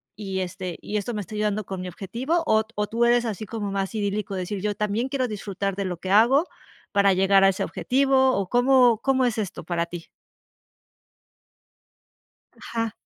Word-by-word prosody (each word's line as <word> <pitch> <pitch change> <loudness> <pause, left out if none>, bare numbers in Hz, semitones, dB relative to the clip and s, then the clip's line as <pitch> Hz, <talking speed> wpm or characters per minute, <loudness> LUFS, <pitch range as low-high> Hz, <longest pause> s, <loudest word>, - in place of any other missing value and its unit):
y, 195 -2 -4
este, 185 -1 -5
y 210 - -3
esto 210 +4 -3
me 210 - -3
está 200 - -10
ayudando 210 -1 -1
con 190 0 -5
mi 185 - -5
objetivo", 235 - -2
ot 220 -2 +1
o 210 0 -1
tú 230 +3 +1
eres 240 0 +4
así 215 -2 -4
como 205 -1 -4
más 195 +2 -2
idílico, 205 -1 -2
de 185 - -2
decir: 190 +2 -4
"Yo 205 0 -1
también 210 +4 -1
quiero 260 -2 -1
disfrutar 200 -2 -3
de 200 - -2
lo 180 -2 -3
que 185 +3 -5
hago 240 - +5 0.5
para 200 -1 +4
llegar 195 +1 +4
a - - +7
ese 190 - -1
objetivo", 265 0 +2
o 195 -2 -2
cómo 245 -2 +4
cómo 265 0 +2
es 235 -2 0
esto 200 -5 -4
para 170 0 -1
ti? 170 -1 -9 2.5
Ajá. 230 -1 -3
210 Hz, 190 wpm, -24 LUFS, 195-235 Hz, 2.5 s, a